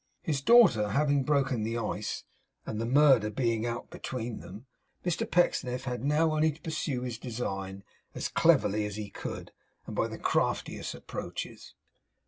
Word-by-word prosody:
His 145 -4 -1
daughter 165 - +6
having 140 +4 +2
broken 135 -4 +1
the 115 +2 -1
ice, 115 - -3 0.4
and 110 - -3
the 115 - -1
murder 135 -5 +5
being 115 0 0
out 120 0 -5
between 120 -3 -5
them, 105 +7 -10 0.4
Mr 175 -2 -1
Pecksniff 125 -7 +1
had 125 -2 -4
now 150 +3 +3
only 155 +1 +3
to 150 - -14
pursue 155 -6 -2
his 120 -3 -4
design 100 -5 -4 0.3
as - - -2
cleverly 105 +1 +3
as 105 - -6
he 105 -1 -6
could, - - -6 0.3
and - - -7
by - - +1
the - - -7
craftiest - - -1
approaches. - - -7
125 Hz, 155 wpm, -29 LUFS, 110-145 Hz, 0.4 s, daughter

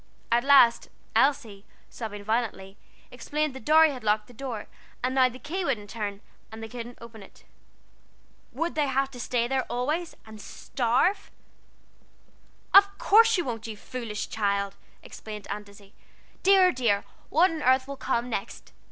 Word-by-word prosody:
At 240 +1 +3
last 270 -4 +5 0.3
Elsie, 250 -8 +1 0.3
sobbing 205 -3 -7
violently, 215 -3 -2 0.4
explained 300 -1 -2
that 265 -4 -11
Dorry 315 0 +6
had 255 -4 -8
locked 210 0 +1
the 245 - -16
door, 235 -3 -6 0.4
and 255 +1 0
now 260 -1 +4
the 250 - -11
key 340 +8 -4
wouldn't 215 - -2
turn, 205 -2 -5 0.3
and 220 0 -9
they - - -5
couldn't 240 +1 -8
open 230 -2 -12
it. 195 - -16 1.1
Would 335 +1 -3
they 300 -2 0
have 270 0 0
to 250 - -11
stay 240 -1 -1
there 265 +1 0
always, 305 +8 -2
and 215 -1 -12
starve? 260 - -1 1.4
"Of 400 0 +7
course 455 +1 +5
you 350 - -1
won't, 230 -3 -5
you 220 -2 -7
foolish 230 -3 -6
child," 200 -2 -1 0.3
exclaimed 210 -2 -9
Aunt 205 0 -6
Izzie. 200 0 -18 0.5
"Dear, 380 -1 +5
dear, 230 -7 +1 0.3
what 335 +5 +4
on 320 -2 -5
earth 260 0 +3
will 280 - -6
come 245 -3 -2
next? 220 -5 -6
245 Hz, 160 wpm, -26 LUFS, 215-285 Hz, 1.4 s, Of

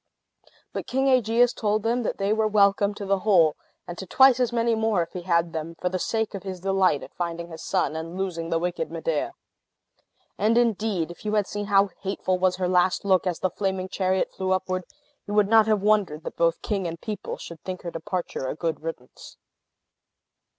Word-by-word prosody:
But - - -4
King 265 +1 +1
Aegeus 245 -1 +3
told 210 -1 0
them 235 +2 +1
that 230 - -2
they 200 +1 +1
were 220 0 +2
welcome 200 -1 +3
to 205 - -6
the 195 0 +1
whole, 180 -7 +4 0.3
and 175 -1 -7
to 190 - -7
twice 260 +4 +6
as 245 -2 +1
many 235 0 +1
more, 220 -5 +1
if 165 - -11
he 180 - -5
had 170 -1 +1
them, 160 +1 -5
for 180 - 0
the 185 0 -2
sake 220 +2 -1
of 195 - -5
his 185 -1 -6
delight 190 -6 +2
at - - -12
finding 170 -1 -4
his 160 -1 -9
son, 185 -4 0
and 165 +3 -5
losing 170 -4 -3
the 165 - +1
wicked 180 - -2
Medea. - - -2 1.1
And, 225 +2 +3
indeed, 215 -7 +1
if 175 - -13
you 215 0 -1
had 210 -2 +2
seen 205 +1 -4
how 200 -1 +4
hateful 190 -1 -1
was 185 0 +2
her 180 0 -1
last 180 +2 +2
look, 190 -2 +3
as 175 -2 -1
the 185 - 0
flaming 190 -2 -2
chariot 190 0 0
flew 190 0 -1
upward, 185 -1 -2 0.4
you 205 - -3
would 210 -1 +4
not 220 -1 +6
have 215 -2 +2
wondered 200 -8 +2
that - - -6
both 165 0 +1
king 195 -4 -1
and 165 0 -6
people 210 +2 -5
should 170 -2 -10
think 185 -1 -6
her 170 - -4
departure 170 -5 -4
a - - -3
good 160 -1 -2
riddance. 155 -6 -8
190 Hz, 210 wpm, -25 LUFS, 175-215 Hz, 1.1 s, twice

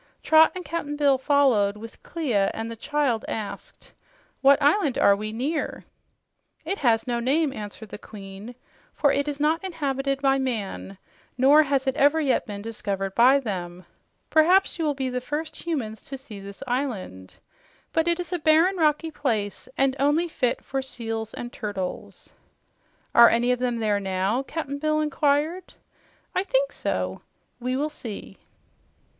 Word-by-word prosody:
Trot 315 0 +6
and 365 -1 -6
Cap'n 295 -1 -3
Bill 285 -3 +3
followed, 255 -8 +3
with 225 +1 -11
Clia, 240 -12 0
and 225 +1 -4
the - - -6
child 260 -1 0
asked, 215 -2 -7 0.5
"What 275 0 +6
island 295 0 +2
are 200 - +5
we 215 +1 -5
near?" 280 +8 -3 0.8
"It 390 +5 -2
has 230 -4 +2
no 240 -2 -1
name," 275 +4 +1
answered 210 -1 -8
the - - -8
Queen, 205 +3 -10 0.4
"for 285 -2 +3
it 280 +1 0
is 290 -1 -3
not 315 +4 +1
inhabited 275 -6 -2
by 270 -1 +2
man, 215 -6 -4 0.4
nor 280 +4 +6
has 275 -2 0
it 265 -1 0
ever 290 +3 +4
yet 280 -5 +1
been 205 -1 -6
discovered 195 -3 -3
by 255 +5 +6
them. 180 -7 -5 0.5
Perhaps 355 +4 +4
you 325 - 0
will 295 -2 0
be 265 -1 -2
the 250 0 -2
first 310 +3 -4
humans 230 -10 -3
to 270 - -8
see 240 -6 -11
this 200 +4 -9
island. 230 - -4 0.6
But 325 0 +1
it 340 0 +1
is 355 +1 -4
a 355 - -1
barren, 320 +5 +4
rocky 315 0 +1
place, 220 -9 -2
and 270 -1 +2
only 295 +5 +2
fit 250 -7 -1
for 270 0 -2
seals 225 -4 -5
and 240 0 -7
turtles." 200 -4 -6 0.8
"Are 235 0 +9
any 240 +2 +2
of 250 - 0
them 245 -1 -1
there 210 -3 +1
now?" 195 +5 0
Cap'n 285 0 -5
Bill 305 +1 +1
inquired. 300 +3 0 0.6
"I - - +1
think - - +1
so. - - -3 0.4
We 255 +1 -2
will 300 +2 -1
see." 230 -8 -8
270 Hz, 160 wpm, -25 LUFS, 220-300 Hz, 0.8 s, Are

